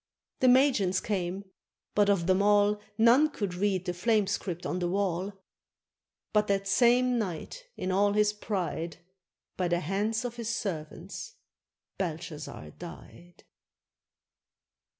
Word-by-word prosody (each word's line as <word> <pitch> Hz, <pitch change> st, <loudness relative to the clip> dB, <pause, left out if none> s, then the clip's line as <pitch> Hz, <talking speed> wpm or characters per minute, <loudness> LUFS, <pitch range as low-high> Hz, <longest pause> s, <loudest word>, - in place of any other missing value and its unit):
The 260 Hz, -, +4 dB
magians 245 Hz, -8 st, +4 dB
came, 190 Hz, -1 st, -3 dB, 0.5 s
but 205 Hz, -1 st, +3 dB
of 195 Hz, -4 st, +2 dB
them 185 Hz, +2 st, +3 dB
all. 205 Hz, 0 st, +3 dB, 0.2 s
None 240 Hz, +7 st, +6 dB
could 205 Hz, -10 st, -3 dB
read 190 Hz, 0 st, 0 dB
the 180 Hz, -, -1 dB
flame 210 Hz, +3 st, +2 dB
script 185 Hz, -3 st, -3 dB
on 180 Hz, -, -2 dB
the 175 Hz, -, 0 dB
wall. 190 Hz, 0 st, -1 dB, 1.0 s
But 210 Hz, -1 st, +3 dB
that 195 Hz, 0 st, 0 dB
same 245 Hz, +3 st, +4 dB
night, 210 Hz, -, -5 dB
in 185 Hz, -, -2 dB
all 200 Hz, +2 st, +3 dB
his 210 Hz, 0 st, +3 dB
pride, 175 Hz, -7 st, -3 dB, 0.6 s
By 180 Hz, -, +1 dB
the 175 Hz, 0 st, +1 dB
hands 210 Hz, +7 st, -1 dB
of 240 Hz, -1 st, -5 dB
his 230 Hz, -2 st, -3 dB
servants 190 Hz, -, -5 dB, 0.6 s
Belshazzar 155 Hz, -, -5 dB
died. 175 Hz, 0 st, -12 dB
200 Hz, 130 wpm, -29 LUFS, 180-215 Hz, 1.0 s, None